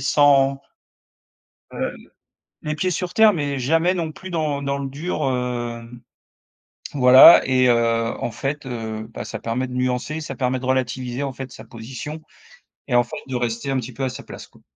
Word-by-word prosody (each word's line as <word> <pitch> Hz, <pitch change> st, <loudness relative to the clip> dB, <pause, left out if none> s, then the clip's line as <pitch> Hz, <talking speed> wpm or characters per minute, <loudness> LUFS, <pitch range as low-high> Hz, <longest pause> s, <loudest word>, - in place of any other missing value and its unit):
sans, 140 Hz, -2 st, +3 dB, 1.1 s
heu, -, -, -3 dB, 0.7 s
les 155 Hz, 0 st, -2 dB
pieds 185 Hz, +4 st, 0 dB
sur 180 Hz, +1 st, -3 dB
terre, 220 Hz, -1 st, +6 dB
mais 145 Hz, -5 st, -2 dB
jamais 165 Hz, +8 st, +2 dB
non 165 Hz, -3 st, -3 dB
plus 185 Hz, +4 st, -10 dB
dans 150 Hz, -4 st, -1 dB
dans 140 Hz, 0 st, -2 dB
le 140 Hz, -1 st, -4 dB
dur, 150 Hz, +7 st, -4 dB
hem 120 Hz, -2 st, -4 dB, 0.9 s
voilà 130 Hz, +4 st, +9 dB
et 130 Hz, -1 st, +3 dB
heu, 115 Hz, -1 st, +1 dB
en -, -, -2 dB
fait, 140 Hz, +6 st, -4 dB
heu 110 Hz, -3 st, -5 dB
bah, -, -, -5 dB
ça 110 Hz, -, -6 dB
permet 120 Hz, +4 st, -2 dB
de 125 Hz, -, -9 dB
nuancer, 125 Hz, +5 st, -2 dB
ça 140 Hz, -3 st, -6 dB
permet 125 Hz, +1 st, -1 dB
de 130 Hz, -, -7 dB
relativiser 130 Hz, 0 st, -1 dB
en 135 Hz, -, -3 dB
fait 130 Hz, 0 st, -8 dB
sa 110 Hz, -, -11 dB
position, 125 Hz, +7 st, -8 dB, 0.7 s
et 120 Hz, -, 0 dB
en 120 Hz, -, +5 dB
fait 120 Hz, -, -8 dB
de 130 Hz, -, -4 dB
rester 120 Hz, +2 st, -2 dB
un 135 Hz, -, 0 dB
petit 125 Hz, +1 st, -7 dB
peu 135 Hz, -, -5 dB
à 130 Hz, -, 0 dB
sa 135 Hz, +2 st, -9 dB
place -, -, -10 dB
quoi. -, -, -23 dB
130 Hz, 185 wpm, -22 LUFS, 120-145 Hz, 1.1 s, voilà